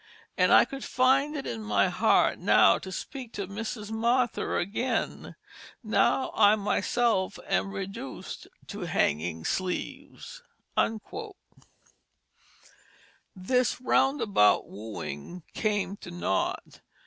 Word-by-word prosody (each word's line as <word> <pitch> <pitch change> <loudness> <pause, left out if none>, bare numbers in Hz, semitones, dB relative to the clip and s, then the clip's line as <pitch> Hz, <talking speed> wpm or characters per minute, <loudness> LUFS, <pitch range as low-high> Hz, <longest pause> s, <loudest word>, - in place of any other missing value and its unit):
And - - +3
I - - +7
could 275 -1 -8
find 270 +4 +2
it 275 - -5
in 115 -1 -4
my 105 -1 +2
heart - - +2
now - - +5
to 190 - -8
speak 250 - -7
to 200 - -4
Mrs 210 +2 -6
Martha 235 +2 0
again, 225 +6 -2 0.5
now 225 +4 +2
I 210 -1 +5
myself 205 0 0
am - - 0
reduc'd 195 -9 -7 0.2
to - - -6
Hanging 80 +2 0
Sleeves." 185 - -4 2.9
This 250 +8 0
roundabout 255 - +3
wooing 105 - -7
came 205 -2 -1
to - - -10
naught. 175 - -2
205 Hz, 100 wpm, -28 LUFS, 175-245 Hz, 2.9 s, I